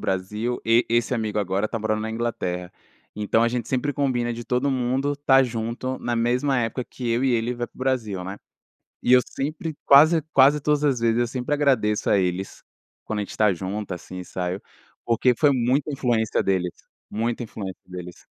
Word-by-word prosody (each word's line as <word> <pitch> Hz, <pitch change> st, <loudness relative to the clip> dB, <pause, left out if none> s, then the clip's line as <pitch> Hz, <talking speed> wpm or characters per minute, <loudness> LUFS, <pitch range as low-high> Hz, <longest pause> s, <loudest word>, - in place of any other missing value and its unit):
Brasil 105 Hz, +6 st, -2 dB
e 115 Hz, +2 st, +4 dB
esse 120 Hz, +2 st, +2 dB
amigo 110 Hz, -2 st, -2 dB
agora 100 Hz, +1 st, 0 dB
está 115 Hz, +1 st, -4 dB
morando 110 Hz, 0 st, -1 dB
na 110 Hz, +1 st, -3 dB
Inglaterra. 90 Hz, -6 st, -3 dB, 0.4 s
Então, 105 Hz, +2 st, +1 dB
a 115 Hz, -, +3 dB
gente 120 Hz, -1 st, -3 dB
sempre 135 Hz, +3 st, 0 dB
combina 125 Hz, -4 st, 0 dB
de 120 Hz, 0 st, -7 dB
todo 130 Hz, +3 st, 0 dB
mundo 130 Hz, +2 st, 0 dB
estar 140 Hz, -2 st, +4 dB
junto 120 Hz, +2 st, -3 dB
na 120 Hz, 0 st, -2 dB
mesma 125 Hz, +4 st, +1 dB
época 120 Hz, +2 st, -1 dB
que 125 Hz, 0 st, -6 dB
eu 115 Hz, +2 st, +1 dB
e 135 Hz, -, +2 dB
ele 120 Hz, +1 st, 0 dB
vai 120 Hz, 0 st, -3 dB
para -, -, -48 dB
o -, -, -17 dB
Brasil, 115 Hz, -8 st, -1 dB
né. 95 Hz, +2 st, -6 dB, 0.7 s
E 125 Hz, -, +3 dB
eu 125 Hz, -, +8 dB
sempre, 155 Hz, +3 st, -4 dB
quase 155 Hz, +4 st, +7 dB
quase 140 Hz, +3 st, +5 dB
todas 150 Hz, 0 st, +1 dB
as 140 Hz, -4 st, +2 dB
vezes 115 Hz, 0 st, +2 dB
eu 120 Hz, -, +2 dB
sempre 125 Hz, +4 st, -2 dB
agradeço 130 Hz, -8 st, +1 dB
a 100 Hz, -, +4 dB
eles, 95 Hz, +1 st, -2 dB, 0.4 s
quando 110 Hz, -, -3 dB
a -, -, 0 dB
gente 100 Hz, -, -7 dB
está 105 Hz, -2 st, +2 dB
junto 95 Hz, +3 st, -4 dB
assim, 90 Hz, +1 st, -8 dB
sabe, 90 Hz, +1 st, -4 dB, 0.4 s
porque 120 Hz, +2 st, +3 dB
foi 150 Hz, -, +5 dB
muita 130 Hz, +4 st, +1 dB
influência 120 Hz, -5 st, +1 dB
deles, 90 Hz, -2 st, 0 dB, 0.4 s
muita 115 Hz, +3 st, -2 dB
influência 100 Hz, -4 st, -7 dB
deles. 90 Hz, -1 st, -9 dB
120 Hz, 190 wpm, -24 LUFS, 105-130 Hz, 0.7 s, eu